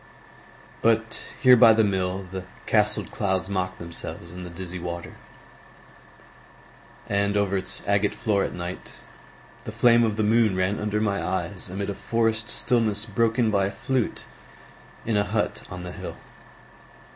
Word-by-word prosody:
But 115 0 +1 0.2
here 125 -1 +9
by 115 -2 +8
the 110 0 +4
mill 95 -1 -1
the 95 -1 -5 0.2
castled - - +1
clouds 95 -2 -1
Mocked 95 -1 -2
themselves 85 0 -7
in 90 +1 -8
the 90 - -7
dizzy 90 +1 -7
water; 85 0 -6 1.9
And 100 0 +1
over 100 -1 +1
its 95 -1 0
agate 100 0 +2
floor 105 -4 +1
at - - -2
night 90 +1 -6 0.7
The - - -5
flame 120 -1 +5
of 110 -2 +1
the 110 - 0
moon 110 -2 +3
ran 95 +2 0
under 105 0 -1
my 100 -2 0
eyes 95 +1 -3
Amid 100 +2 -3
a 100 - -2
forest 115 +2 0
stillness 110 -4 +1
broken 115 +1 +1
By 100 -2 +2
a - - -4
flute 130 +1 -2 0.8
in 110 -2 +1
a 100 - +3
hut 105 +1 -1
on 90 -1 -7
the 90 - -6
hill. - - -7
100 Hz, 155 wpm, -25 LUFS, 95-110 Hz, 1.9 s, here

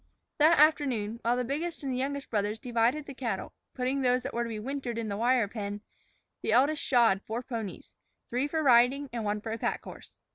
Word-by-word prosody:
That 315 +3 +6
afternoon, 260 -8 +3
while 240 +2 +1
the 250 - -1
biggest 310 +6 -3
and 270 -2 -2
the - - -2
youngest 280 +1 -3
brothers 210 0 0
divided 245 +4 0
the 280 - -8
cattle, 235 -7 -4 0.2
putting 260 +2 -1
those 250 -1 +2
that 270 - -5
were 235 - -1
to 235 - -2
be 220 - -4
wintered 250 +1 -4
into 225 -2 -3
the 200 - -3
wire 240 -1 +3
pen, 205 -1 -5 0.6
the 215 - 0
eldest 285 +5 +3
shod 230 -6 +3
four 230 +3 -3
ponies, 225 -6 -6 0.4
three 250 +4 -1
for 315 +1 -1
riding 260 +2 +4
and 230 -2 -3
one 210 0 -1
for 220 - -5
a 225 - -3
pack - - -2
horse. - - -12
245 Hz, 215 wpm, -29 LUFS, 225-275 Hz, 0.6 s, That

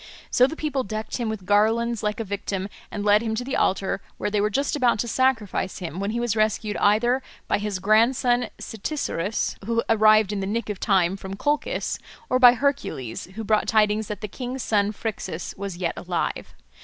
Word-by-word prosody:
So 250 - +5
the 315 - -6
people 290 -5 -1
decked 215 +1 -4
him 235 -3 -2
with 215 -4 -5
garlands 225 +3 +2
like 210 +1 -2
a - - -1
victim 200 -1 -3 0.2
and 205 0 -4
led 210 +1 +5
him 220 -1 -2
to 240 - -2
the 265 +2 -3
altar, 195 +1 0 0.2
where 205 - -2
they 210 -1 +1
were 210 - +2
just 275 +8 0
about 250 -6 +3
to 235 - -2
sacrifice 230 -7 0
him 175 -2 -5
when 200 +1 -1
he 230 +2 -1
was 240 -2 0
rescued 215 -1 0
either 240 +5 +3 0.3
by - - +1
his 205 -2 -2
grandson 240 +4 +3
Cytisorus, 220 - -3
who 230 +2 0
arrived 215 -2 +5
in 205 - -2
the 190 - -2
nick 220 +1 -2
of 200 - -7
time 190 -3 +2
from 195 0 -7
Colchis, 295 - -1 0.3
or 255 - +3
by 245 -1 +9
Hercules, 250 - -2
who 225 - -4
brought 215 0 +1
tidings 215 -1 +2
that 210 -2 -5
the 210 - -3
king's 250 +4 -5
son 205 -1 +2
Phrixus 200 -5 -5
was 195 -3 -5
yet 175 -2 -1
alive. 175 -1 -3
215 Hz, 200 wpm, -24 LUFS, 200-240 Hz, 0.3 s, by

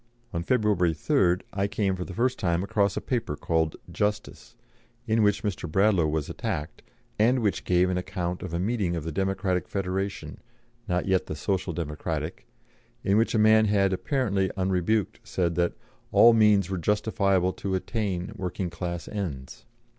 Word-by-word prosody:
On 85 - -1
February 100 -7 +2
3rd 90 - +2
I 100 0 0
came 100 -2 0
for 90 - -4
the 95 - -8
first 125 +4 0
time 85 -1 +1
across 100 -1 +1
a - - -1
paper 115 - -2
called 80 0 0 0.2
Justice, 105 +3 -3 0.5
in 110 -1 +2
which 105 -1 +2
Mr. 90 -5 -3
Bradlaugh 95 -3 +3
was 75 -1 -1
attacked, 90 -10 -4 0.4
and 120 +5 +4
which 105 - 0
gave 90 0 +3
an 90 0 0
account 90 -2 -4
of 95 - -6
a 85 - -1
meeting 100 -3 0
of 80 - -3
the 80 - -4
Democratic 95 +1 -1
Federation 95 0 -3 0.5
not 90 -2 0
yet 95 -1 +1
the - - -4
Social 95 +3 -1
Democratic 75 -2 -4 0.6
in 100 - +2
which 115 +2 +2
a - - +4
man 110 0 +5
had, 100 -2 +2
apparently 100 -4 0
unrebuked, 95 +2 0
said 85 -2 -1
that 85 +1 +1 0.4
"all 120 - +7
means 105 -4 +4
were 95 -2 -3
justifiable 100 -1 +1
to 95 -1 -3
attain" 95 -1 -2
working 90 -2 -3
class 85 0 -5
ends. 75 -11 -6
95 Hz, 165 wpm, -26 LUFS, 90-105 Hz, 0.6 s, all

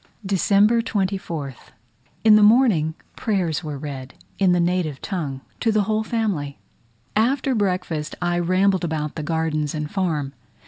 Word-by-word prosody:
December 200 +4 +3
24th. 185 - -3 0.5
In 220 -1 +7
the 215 - +6
morning, 210 -9 +4 0.2
prayers 180 -6 -1
were 150 -2 -5
read 135 -2 -7 0.2
in 190 -2 +4
the 180 - +3
native 170 -5 0
tongue 145 -9 -4 0.2
to 225 - +2
the 215 -1 +2
whole 215 +1 0
family. 200 -12 -2 0.6
After 260 +5 +2
breakfast 180 -7 -1
I 175 0 0
rambled 185 +2 +2
about 155 -3 -2
the 155 - -5
gardens 155 -1 -1
and 150 -1 -4
farm. 155 -8 -1
180 Hz, 140 wpm, -22 LUFS, 155-205 Hz, 0.6 s, In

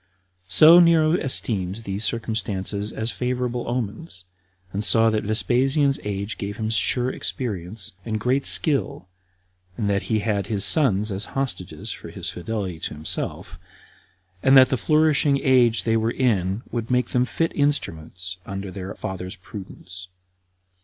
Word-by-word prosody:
So 160 - +8
Nero 165 -2 +4
esteemed 105 - -2
these 105 -2 -5
circumstances 105 -2 -2
as 110 +2 -3
favorable 125 -1 -3
omens, 120 - -4 0.5
and 100 +2 -2
saw 115 +1 +3
that 110 -1 -1
Vespasian's 135 +6 +2
age 100 +1 -4
gave 100 0 -5
him 110 0 -3
sure 125 +2 +2
experience, 105 -3 -3
and 110 0 -3
great 130 +5 +1
skill, 140 - +3 0.7
and 110 -4 -2
that 100 -1 0
he 110 - +2
had 100 -3 -1
his 105 -3 +2
sons 110 - +4
as 95 +2 -2
hostages 130 -9 -3
for - - -9
his - - -5
fidelity 95 -3 -5
to - - -5
himself, 75 +1 -5 0.8
and 135 +1 +5
that 130 -1 +7
the 135 - +1
flourishing 150 0 +2
age 125 -4 +3
they 115 -1 +1
were 110 +1 0
in 105 -4 0
would 115 -1 -4
make 125 0 +1
them 125 0 +1
fit 165 +6 -2
instruments 90 - -2
under 95 0 -6
their 95 0 -7
father's 95 -1 -6
prudence. 90 -1 -10
110 Hz, 145 wpm, -23 LUFS, 95-130 Hz, 0.8 s, So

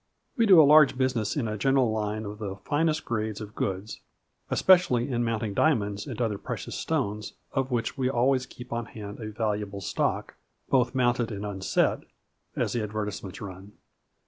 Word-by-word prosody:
We 230 -4 +3
do 185 -4 +9
a - - +10
large 150 -2 +6
business 130 -5 0
in 125 -6 0
a 105 -1 -4
general 135 -3 +3
line 110 0 -2
of 105 +1 -7
the 100 -3 -4
finest 155 +9 0
grades 110 -2 -2
of 105 -1 -8
goods, 95 +2 -3 0.5
especially 170 -10 +4
in 120 -1 0
mount 115 -1 -1
ing 105 -2 -2
diamonds 100 -7 +1
and - - -6
other 110 -4 -1
precious - - -5
stones, 105 +1 -2
" - - -44
of 135 -1 -1
which 120 +2 -2
we 130 -1 +2
always 130 0 +2
keep 125 0 -9
on 120 -1 -3
hand 105 0 -8
a 110 -2 -5
valuable 105 -2 -2
stock, 95 - -1 0.4
both 130 0 +2
mounted 120 -2 +1
and 100 -1 -5
unset/' 95 -2 0 0.5
as - - -1
the 120 - 0
advertisements 105 -2 -4
run. 100 0 -9
110 Hz, 180 wpm, -27 LUFS, 105-130 Hz, 0.5 s, a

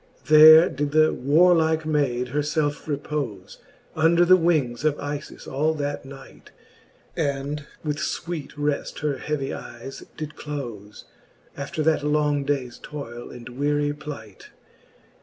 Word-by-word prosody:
There 155 +2 +9
did 145 +1 -3
the 155 0 +4
warlike 160 +2 +3
maide 130 -5 0
her 145 +3 0
felfe 150 0 -1
repole> 140 -10 -4 0.4
Under 165 +2 +4
the 185 +1 +7
wings 155 -9 +1
of 155 -2 +2
IJis 145 +1 -6
all 155 +4 0
that 145 -1 -4
night, 135 0 -13 0.7
And 140 -1 -2 0.2
with 150 -2 -2
fweete 160 0 -4
reft 145 -1 -2
her 145 -2 -1
heavy 150 -3 -3
eyes 120 +3 -9
did 155 -1 -6
clofe 120 -9 -7 0.5
After 140 +2 -4
that 155 -2 +2
long 150 -1 +1
daies 135 -4 -2
toile 120 -5 -8
and 120 -1 -10
weary 145 +3 0
plight. 140 -9 -10
145 Hz, 130 wpm, -24 LUFS, 135-155 Hz, 0.7 s, There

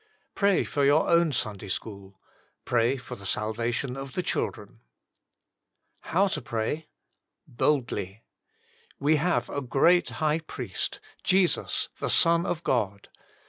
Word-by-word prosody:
Pray 200 -2 +3
for 145 - -1
your 145 +3 +4
own 170 -1 +4
Sunday 110 -5 -2
school. 100 -1 -6 0.5
Pray 120 +3 +2
for 125 - -8
the 100 - -13
salvation 115 +5 -2
of 135 -1 -7
the 180 - -1
children. - - -3 1.3
now 190 +4 +4
TO 195 - -2
PEAT. 120 - -3 0.8
"We 150 +3 +3
have 175 +4 +1
a 140 - -3
great 140 +8 +3
High 155 0 0
Priest, 160 - -5 0.2
Jesus 185 -1 +2
the - - -2
Son 170 +1 +4
of 170 0 -2
God. 100 -8 -1
135 Hz, 120 wpm, -27 LUFS, 115-165 Hz, 1.3 s, your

